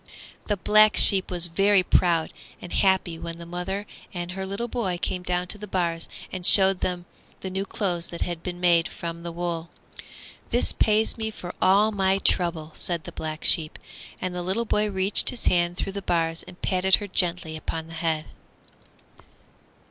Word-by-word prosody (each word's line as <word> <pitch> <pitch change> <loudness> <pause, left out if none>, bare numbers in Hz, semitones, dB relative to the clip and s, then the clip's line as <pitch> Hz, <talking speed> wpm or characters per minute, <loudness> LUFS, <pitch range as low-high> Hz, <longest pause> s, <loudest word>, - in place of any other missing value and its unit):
The 205 - 0
Black 215 +1 +4
Sheep 190 -2 +6
was 175 -1 -2
very 195 +3 +2
proud 170 -2 +1 0.3
and 175 - -9
happy 190 -4 +1
when 165 0 -7
the 170 - -10
mother 180 +4 -4 0.3
and 175 -1 -5
her 190 +1 -5
little 200 +5 -3
boy 210 -7 -2
came 180 - -3
down 180 0 -2
to 210 - -2
the 210 - -8
bars 170 -3 -2 0.2
and 185 - -6
showed 190 0 +6
the 180 -1 -3 0.4
new 190 +1 -3
clothes 175 -5 0
that 170 - -8
had 175 -2 -3
been 175 0 -6
made 170 -2 +3
from 170 0 -7
the 170 0 -6
wool. 170 -1 -4 0.8
"This 240 - +1
pays 220 +1 +1
me 220 0 -2
for 180 -4 -8
all 200 +4 +4
my 195 -2 +1
trouble," 170 -5 0
said 170 -3 -3
the - - -9
Black 155 0 -6
Sheep, 155 -2 +5 0.4
and 185 0 -4
the 180 - -4
little 190 +6 -1
boy 210 -1 0
reached 190 0 +3
his 245 - -3
hand 175 0 +1
through 195 - -4
the 200 - -5
bars 165 -2 -1
and 185 -1 -13
patted 190 0 +3
her 205 - -6
gently 175 -4 -1
upon 160 +1 -5
the 165 - -12
head. 160 -1 -2
180 Hz, 180 wpm, -24 LUFS, 170-195 Hz, 0.8 s, Sheep